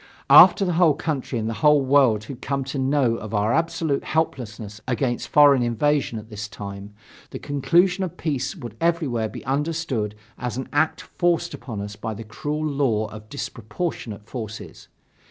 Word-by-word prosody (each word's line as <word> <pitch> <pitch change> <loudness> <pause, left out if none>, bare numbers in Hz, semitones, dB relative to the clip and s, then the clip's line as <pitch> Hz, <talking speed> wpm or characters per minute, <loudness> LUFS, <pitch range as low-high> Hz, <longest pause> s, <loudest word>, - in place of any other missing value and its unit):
After 195 - +9
the 180 - 0
whole 160 -5 +5
country 140 -5 -3
and 110 -1 -2
the 115 - -2
whole 150 -3 +5
world 130 -6 +4
had 125 +3 -9
come 140 0 -2
to 135 +1 -4
know 130 -3 +2
of 110 -1 -6
our 105 +2 +1
absolute 160 -2 0
helplessness 110 -9 -3
against 120 -1 -1
foreign 145 -3 +6
invasion 120 +1 +1
at 110 +1 -10
this 105 0 -5
time, 100 0 -8 0.3
the - - -6
conclusion 175 +7 +2
of 180 - -5
peace 140 -1 -2
would 120 - -9
everywhere 150 -10 0
be - - -9
understood 135 -6 -1 0.2
as 125 -1 -3
an 130 - -5
act 155 +2 +1
forced 175 -3 0
upon 120 -6 -6
us 100 0 -6
by 110 0 -5
the 115 - -7
cruel 150 +7 -4
law 135 -7 0
of 110 0 -11
disproportionate 115 - -5
forces. 110 -3 -8
130 Hz, 170 wpm, -23 LUFS, 110-150 Hz, 0.3 s, After